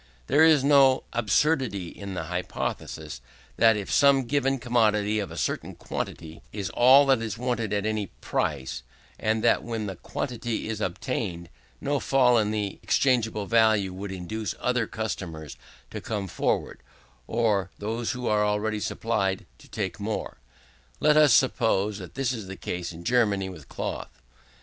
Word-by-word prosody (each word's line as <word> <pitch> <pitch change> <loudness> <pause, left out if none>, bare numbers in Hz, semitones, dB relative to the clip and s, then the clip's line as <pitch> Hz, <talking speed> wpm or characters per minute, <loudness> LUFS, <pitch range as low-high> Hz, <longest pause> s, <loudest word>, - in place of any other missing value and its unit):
There 145 - +4
is 155 -4 +6
no 135 -2 +5
absurdity 120 - +1
in 100 0 -8
the 85 - -3
hypothesis, 80 -5 -4 0.4
that 115 -2 +5
of 100 - -5
some 140 -2 +5
given 135 +1 +1
commodity 110 -4 +2
a 85 -5 -5
certain - - -2
quantity 80 0 -6
is 100 -3 -4
all 130 +4 +7
that 135 -4 +3
is 115 0 -4
wanted 120 -3 -2
at 105 0 0
any 110 -2 -1
price, 70 -5 -3 0.4
and 110 0 0
that - - +4
when 115 -2 -4
that 95 -4 -7
quantity 120 -3 -3
is 110 -1 -4
obtained, 90 -3 -3 0.3
no 145 0 0
fall 125 -4 +4
in 105 -1 +1
the 105 -2 -3
exchangeable 110 -6 +1
value 110 -4 +3
would 95 +1 -6
induce 100 +4 -4
other 125 -2 0
consumers 85 -9 -5 0.4
to - - -6
come 105 -3 -3
forward, - - -1 0.5
or 105 -5 +1
those 115 +3 -2
who 125 0 -5
are 105 -2 +2
already 105 +1 0
supplied 100 -3 -1
to - - -16
take - - -4
more. - - -4 0.6
Let 150 0 +4
us 150 -3 +6
suppose 105 -5 +2
that 90 - -10
this 135 -2 0
is 110 -6 -5
the 95 - -6
case 90 0 -4
in 85 0 -10
Germany 100 -4 +2
with 80 -7 -11
cloth. - - -5
110 Hz, 155 wpm, -26 LUFS, 95-125 Hz, 0.6 s, all